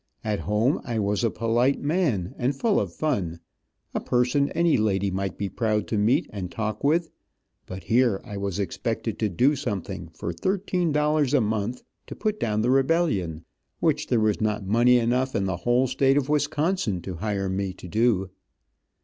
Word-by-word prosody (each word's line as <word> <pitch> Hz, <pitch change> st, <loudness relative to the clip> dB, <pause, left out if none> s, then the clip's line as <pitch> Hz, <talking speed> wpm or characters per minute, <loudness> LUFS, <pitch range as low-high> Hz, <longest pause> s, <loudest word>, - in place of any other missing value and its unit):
At 105 Hz, -2 st, -1 dB
home, 105 Hz, -, +1 dB
I 120 Hz, -2 st, -3 dB
was 105 Hz, +1 st, 0 dB
a 115 Hz, -, +3 dB
polite 115 Hz, +5 st, +1 dB
man, 145 Hz, -, 0 dB
and 130 Hz, +3 st, 0 dB
full 215 Hz, -, +2 dB
of -, -, -2 dB
fun, 95 Hz, -, -2 dB, 0.5 s
a -, -, 0 dB
person 125 Hz, +3 st, +1 dB
any 170 Hz, -1 st, +3 dB
lady 100 Hz, -3 st, +1 dB
might 95 Hz, 0 st, -3 dB
be 100 Hz, -, -2 dB
proud 105 Hz, 0 st, -1 dB
to -, -, -1 dB
meet 125 Hz, +11 st, +2 dB
and 95 Hz, -4 st, -4 dB
talk 110 Hz, +1 st, -4 dB
with, 160 Hz, +3 st, +2 dB, 0.6 s
but 95 Hz, -1 st, -7 dB
here 115 Hz, +1 st, +2 dB
I 105 Hz, -4 st, -8 dB
was 100 Hz, -2 st, -3 dB
expected 110 Hz, +3 st, -3 dB
to 110 Hz, -, +1 dB
do 130 Hz, -, +3 dB
something, 100 Hz, -8 st, -4 dB
for 85 Hz, -, -4 dB
thirteen 180 Hz, -, -1 dB
dollars 150 Hz, -1 st, +2 dB
a 135 Hz, -, +4 dB
month, 110 Hz, +3 st, -2 dB, 0.2 s
to -, -, -7 dB
put 215 Hz, -1 st, -2 dB
down 110 Hz, -1 st, 0 dB
the 125 Hz, -, +2 dB
rebellion, 135 Hz, -, +1 dB, 0.3 s
which 150 Hz, -2 st, +1 dB
there 120 Hz, -, +2 dB
was 110 Hz, -1 st, +1 dB
not 105 Hz, -2 st, -1 dB
money 120 Hz, +5 st, +4 dB
enough 125 Hz, +3 st, 0 dB
in 100 Hz, -, +1 dB
the 95 Hz, -2 st, -1 dB
whole 120 Hz, +6 st, +2 dB
state 135 Hz, +2 st, +2 dB
of 145 Hz, -1 st, 0 dB
Wisconsin 150 Hz, -, 0 dB
to 90 Hz, -2 st, -6 dB
hire 100 Hz, 0 st, -2 dB
me 95 Hz, 0 st, -2 dB
to 90 Hz, -, -11 dB
do. 105 Hz, -2 st, +1 dB
115 Hz, 185 wpm, -25 LUFS, 100-140 Hz, 0.6 s, a